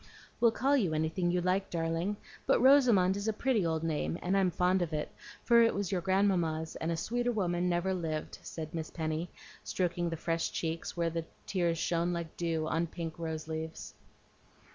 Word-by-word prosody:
"We'll 235 - +6
call 270 +5 +2
you 185 - +1
anything 160 +3 0
you 180 0 +1
like, 185 +2 0
darling; 165 +4 -1 0.3
but - - +4
Rosamond 240 -9 +5
is 200 +2 -3
a 220 - +2
pretty 235 -2 +1
old 160 -1 0
name, 165 +1 -1
and 185 +2 +1
I'm 195 -2 +3
fond 180 +2 +2
of 170 -2 -2
it, 150 0 -2 0.3
for 235 -1 +6
it 230 - +4
was 200 -2 -2
your 185 -2 0
grandmamma's, 175 -4 +1
and 160 - -2
a 165 - -1
sweeter 240 +7 0
woman 180 -5 0
never 175 +2 +1
lived," 160 -4 -3
said 155 -2 -7
Miss 160 -1 -4
Penny, 160 +1 -3 0.3
stroking 175 -1 -1
the 165 - -4
fresh 165 +1 -1
cheeks, 165 +1 -3
where 170 -1 +1
the 165 0 -3 0.2
tears 175 -3 0
shone 170 +1 0
like 170 -2 -5
dew 165 -2 -1
on 165 +2 0
pink 165 -1 -6
rose 160 -1 -4
leaves. 160 0 -5
175 Hz, 190 wpm, -31 LUFS, 160-190 Hz, 0.3 s, We'll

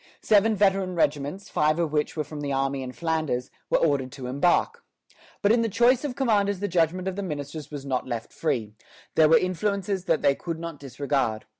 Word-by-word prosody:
Seven 215 +1 +4
veteran 195 -2 +2
regiments, 150 +4 -1
five 155 +1 +1
of 170 -3 0
which 150 +1 -1
were 155 - 0
from 150 0 -8
the 140 -1 -3
army 135 0 0
in 130 -1 -5
Flanders, 155 -5 -2 0.2
were - - +4
ordered 140 -5 +1
to 130 - -8
embark. 140 +8 +1 0.6
But 205 - +5
in 230 +1 +4
the 230 - 0
choice 240 +5 +3
of 275 -4 -3
commanders 205 -7 +1
the 205 - -1
judgment 180 +1 +1
of 190 - -2
the 200 - -3
ministers 150 -3 -5
was 145 -2 -7
not 130 -2 -2
left 115 -3 -5
free; 110 -9 -2 0.4
there 155 -1 +5
were 160 - +7
influences 195 +1 -1
that 165 - +1
they 140 - +5
could 165 +3 -5
not 165 -3 -7
disregard. 135 -5 -2
160 Hz, 200 wpm, -26 LUFS, 140-195 Hz, 0.6 s, were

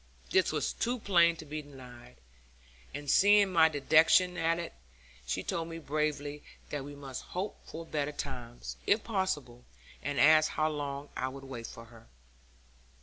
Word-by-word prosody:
This 375 - +3
was - - -1
too 245 +2 -1
plain 170 -6 +4
to 160 - -10
be 155 +1 -5
denied, 125 - -13 0.8
and 145 +1 -7
seeing 200 +4 +5
my 160 -2 +6
dejection 160 +5 +4
at 165 -1 +1
it, 170 - -5 0.5
she 95 +9 -1
told 165 -1 -2
me 165 0 -6
bravely 150 -1 -2 0.3
that 145 -2 -3
we 145 +1 -9
must 135 -2 -7 0.2
hope 195 +3 -3
for 165 +1 -7
better 150 -2 -2
times, 125 -5 -7
if 210 +1 +3
possible, 150 - -2 0.4
and 145 +1 -2
asked 155 0 +6
how 155 0 0
long 145 -1 -4
I 130 - -1
would 135 +1 -8
wait 125 -4 -7
for 115 - -10
her. 115 - -17
150 Hz, 160 wpm, -31 LUFS, 135-165 Hz, 0.8 s, my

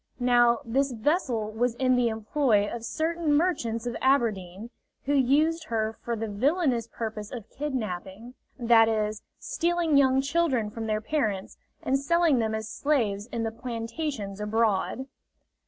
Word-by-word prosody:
Now, 240 -1 +4
this 270 +4 +1
vessel 235 - 0
was 235 +2 0
in 255 0 +2
the 245 -1 +2
employ 220 -1 +1
of 230 +1 -6
certain 325 +4 -1
merchants 250 -9 0
of 240 -1 -3
Aberdeen, 225 -5 0 0.3
who 285 - +1
used 300 +5 +2
her 220 -3 -1
for 235 - -2
the 225 0 -3
villanous 255 - +1
purpose 220 -2 -5
of 230 -4 -7
kidnapping 225 -5 -5 0.2
that 230 -2 +5
is, 215 -1 -1 0.2
stealing 340 -3 0
young 265 -1 +4
children 275 -6 0
from 225 0 -5
their 215 0 0
parents 215 -7 -2 0.3
and 270 +1 +1
selling 320 -1 +3
them 220 -1 0
as 220 0 -4
slaves 220 -9 0
in 235 -2 -3
the 225 - -2
plantations 230 -2 -5
abroad. 220 +3 0
235 Hz, 145 wpm, -27 LUFS, 220-280 Hz, 0.3 s, that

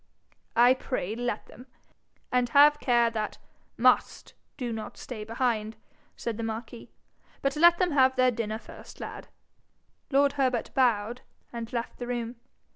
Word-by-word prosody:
'I 245 +2 +6
pray, 215 -5 -3
let 245 +1 -3
them. 250 - -14 0.6
And 250 -1 +2
have 295 +1 +7
care 240 -3 +3
that 215 -2 -3 0.4
MUST - - +2 0.2
do 245 -4 -3
not 220 -1 -7
stay 225 -4 -7
behind,' 225 -1 -1 0.4
said 230 -3 -4
the 230 - -4
marquis. 225 +1 -6 0.5
'But 275 +1 +1
let 345 +3 +6
them 360 -1 +1
have 260 -2 +4
their 255 -1 +4
dinner 220 -2 -3
first, - - -13
lad.' - - -7 0.8
Lord 280 0 +3
Herbert 255 -4 0
bowed, 240 -2 +1 0.3
and 235 -1 -6
left 235 -1 -4
the 245 - -5
room. 240 -1 -3
240 Hz, 145 wpm, -28 LUFS, 225-260 Hz, 0.8 s, have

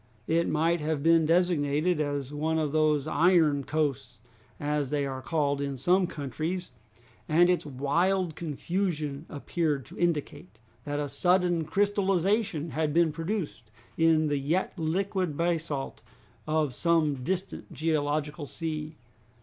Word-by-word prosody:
It 165 +1 +1
might 165 +2 +1
have 150 -2 -1
been 165 -1 +4
designated 165 -1 +2
as 145 -2 -3
one 160 +2 0
of 155 -3 0
those 155 -2 +2
iron 160 -4 +3
coasts, 140 -6 -2 0.4
as 145 -2 -1
they 145 -1 0
are 135 -1 -4
called 140 +1 0
in 140 -1 -3
some 180 +7 +3
countries, 160 +5 -4 0.6
and 175 +3 +5
its 175 -4 -1
wild 165 +6 0
confusion 155 -2 -3
appeared 145 -2 -2
to - - -13
indicate 150 - -2 0.3
that 145 0 -2
a 145 - -1
sudden 175 +3 +2
crystallization 195 -2 +1
had 155 -1 -1
been 170 -2 +4
produced 165 - -4 0.3
in 160 -1 +4
the 145 -2 0
yet 160 +7 0
liquid 180 -1 -1
basalt 165 -5 -2 0.5
of 155 -3 +1
some 155 -3 +1
distant 185 +4 -3
geological 150 -1 -1
sea. 155 -1 -5
155 Hz, 130 wpm, -28 LUFS, 145-170 Hz, 0.6 s, and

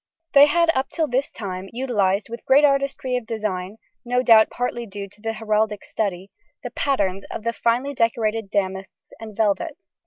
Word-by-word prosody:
They 285 0 +8
had 335 +2 +3
up 265 +1 -1
till 320 -2 -1
this 260 +2 0
time 190 -2 -6
utilised, 210 -6 0
with 235 +1 -8
great 280 +3 +6
artistry 275 -2 0
of 235 -3 -7
design 210 -3 -3 0.3
(no 250 0 0
doubt 225 -3 +6
partly 240 -1 -3
due 200 0 -7
to 205 +2 -22
the 225 0 -2
heraldic 215 -1 -1
study), 195 -3 -3 0.3
the - - -5
patterns 200 -9 0
of - - -6
the 230 0 -1
finely 245 +5 0
decorated 225 -3 0
damasks 190 -1 -4
and 220 -2 -10
velvets. 225 - 0
225 Hz, 175 wpm, -22 LUFS, 200-255 Hz, 0.3 s, They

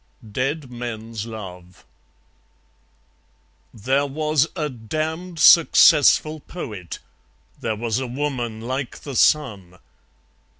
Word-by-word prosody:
Dead 135 +4 -3
Men's 115 -2 -6
Love 90 -5 -10 1.9
There 135 +6 0
was 155 +1 +1
a 155 -4 -1
damned 155 +8 -5
successful 155 -1 +6
Poet; 105 - -8 0.6
There 110 -1 -2
was 115 +2 -2
a 130 - -4
Woman 120 -4 -3
like 130 +2 -5
the 140 -3 -7
Sun. 105 -12 +1
130 Hz, 90 wpm, -22 LUFS, 110-150 Hz, 1.9 s, successful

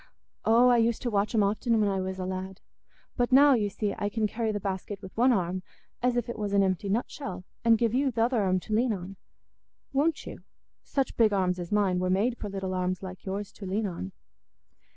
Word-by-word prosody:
"Oh, 235 +3 +6
I 245 - +5
used 230 0 +1
to 240 - -1
watch 205 +2 0
'em 215 - +4
often 220 +3 +1
when 210 - +3
I 195 -1 0
was 190 0 -4
a 185 - -3
lad. 190 +1 -5 0.6
But 245 0 +1
now, 280 +2 +7
you 210 -5 +1
see, 205 +1 -2
I 205 - 0
can 215 +1 -1
carry 220 +1 -1
the 205 - -2
basket 195 0 -4
with 190 -2 -11
one 250 +3 +4
arm, 185 -4 0 0.4
as 245 0 +1
if 240 - -1
it 235 - -5
was 205 -1 -2
an 200 -1 +4
empty 195 +1 -1
nutshell, 195 -3 -3 0.2
and 230 -1 +5
give 230 0 +1
you 270 +1 +2
th' 235 - -24
other 230 0 +2
arm 185 -1 +2
to 215 - -5
lean 230 +1 +2
on. 190 0 -7 0.8
Won't 295 +3 +1
you? - - -8 0.4
Such 270 -3 -2
big 220 -3 +4
arms 185 -2 +1
as 175 -1 -6
mine 200 -3 +2
were 185 0 0
made 215 +6 +1
for 210 - -5
little 195 -1 -4
arms 185 0 -2
like 185 -1 -8
yours 195 +1 -4
to 195 - -9
lean 205 +4 -1
on." 170 - -5
205 Hz, 230 wpm, -28 LUFS, 190-235 Hz, 0.8 s, now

